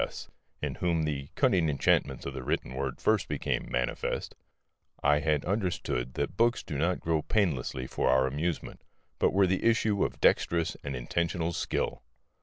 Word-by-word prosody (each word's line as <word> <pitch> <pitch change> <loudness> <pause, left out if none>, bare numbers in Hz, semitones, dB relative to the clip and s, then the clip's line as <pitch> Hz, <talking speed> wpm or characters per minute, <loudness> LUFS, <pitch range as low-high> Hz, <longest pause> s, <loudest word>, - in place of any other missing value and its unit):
S., - - -7 0.3
in - - -1
whom 85 -2 +2
the 70 -3 -2
cunning 85 -4 +3
enchantment 70 - +1
of 70 - -4
the 65 - -5
written 65 - -2
word 65 -1 -3
first - - +2
became - - -2
manifest, 60 0 -2 0.7
I 75 +1 +4
had 75 -1 +1
understood 85 - -1
that - - -2
books 120 +3 +2
did 70 - -4
not 85 +3 +1
grow 80 -2 0
painlessly 75 - 0
for 65 - 0
our 65 0 +4
amusement, 75 +5 -3 0.4
but - - +3
were 95 0 +4
the 95 0 0
issue 110 -3 +3
of - - -3
dexterous 85 -2 +2
and 70 -1 -4
intentional 85 +6 -1
skill. - - -2
80 Hz, 165 wpm, -29 LUFS, 70-90 Hz, 0.7 s, I